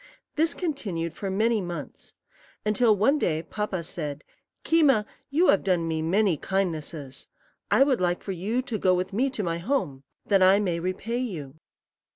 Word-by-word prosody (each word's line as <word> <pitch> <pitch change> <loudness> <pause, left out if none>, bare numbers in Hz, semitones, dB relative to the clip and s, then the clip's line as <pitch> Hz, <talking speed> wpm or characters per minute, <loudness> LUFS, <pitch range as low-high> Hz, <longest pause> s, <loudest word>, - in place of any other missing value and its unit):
This 320 +2 +1
continued 200 - -3
for 195 +3 -5
many 220 +3 +1
months, 175 -5 -7 0.5
until 215 +1 +3
one 275 +9 +3
day 160 - 0
Papa 205 -4 -3
said, 150 -3 -5 0.4
"Keema, 285 -10 +4 0.2
you 320 +6 +3
have 195 - +4
done 180 -4 +1
me 160 -1 -1
many 185 +1 +2
kindnesses: 160 -7 -3 0.4
I - - +5
would 265 -7 +1
like 175 0 0
you 200 +7 -2
to 235 -5 -4
go 185 -1 +3
with 185 +2 -2
me 255 +7 +1
to 240 -5 -4
my 170 -1 -2
home, 175 - -1 0.2
that 195 -2 +3
I 190 +1 +6
may 180 -5 -1
repay 190 +7 -3
you." 165 - -5
195 Hz, 165 wpm, -26 LUFS, 170-230 Hz, 0.5 s, I